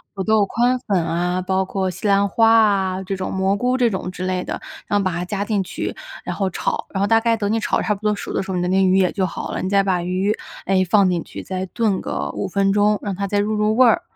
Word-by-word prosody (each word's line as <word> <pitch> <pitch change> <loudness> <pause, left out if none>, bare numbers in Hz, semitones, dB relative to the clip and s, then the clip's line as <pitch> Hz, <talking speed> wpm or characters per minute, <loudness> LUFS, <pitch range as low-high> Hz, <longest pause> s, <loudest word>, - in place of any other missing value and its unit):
土 195 - -2
豆 215 0 +3
宽 245 +5 +1
粉 185 -6 +1
啊， 175 +2 -1
包 190 +1 +1
括 190 0 -2
西 210 - -4
兰 200 0 +3
花 225 +3 +3
啊， 195 -4 +3
这 195 +1 -3
种 190 - -4
蘑 190 +1 +1
菇 250 +5 0
这 245 -2 +3
种 190 -2 -3
之 185 0 -5
类 185 -1 -1
的， - - -4 0.3
然 205 - +1
后 - - 0
把 185 - 0
它 175 +1 -3
加 200 +2 -3
进 205 -3 0
去， 180 - -5 0.3
然 - - -4
后 195 -2 0
炒， - - -3
然 195 - -4
后 200 - +2
大 225 +2 +4
概 230 0 +1
等 205 -1 -1
你 225 - +1
炒 - - 0
得 - - -1
差 210 - +1
不 200 - -9
多 210 0 +1
熟 - - -6
的 - - 0
时 190 - -11
候， 185 - -1
你 - - 0
的 - - 0
那 190 - +2
个 190 - +3
鱼 185 - +4
也 185 -2 +3
就 190 - 0
好 - - -6
了， - - -3
你 185 - -2
再 200 0 +3
把 185 -2 0
鱼， 185 +4 0 0.3
哎， 190 0 +2
放 200 -1 +5
进 175 -2 -1
去， - - -9
再 185 0 -4
炖 210 -1 0
个 70 0 -3
5 - - -3
分 195 +1 +1
钟， 210 0 +3
让 200 -2 -3
它 200 +2 -2
再 205 +1 0
入 210 +2 0
入 215 +1 +1
味 255 -1 +7
儿， 235 - +3
195 Hz, 315 characters per minute, -21 LUFS, 185-210 Hz, 0.3 s, 味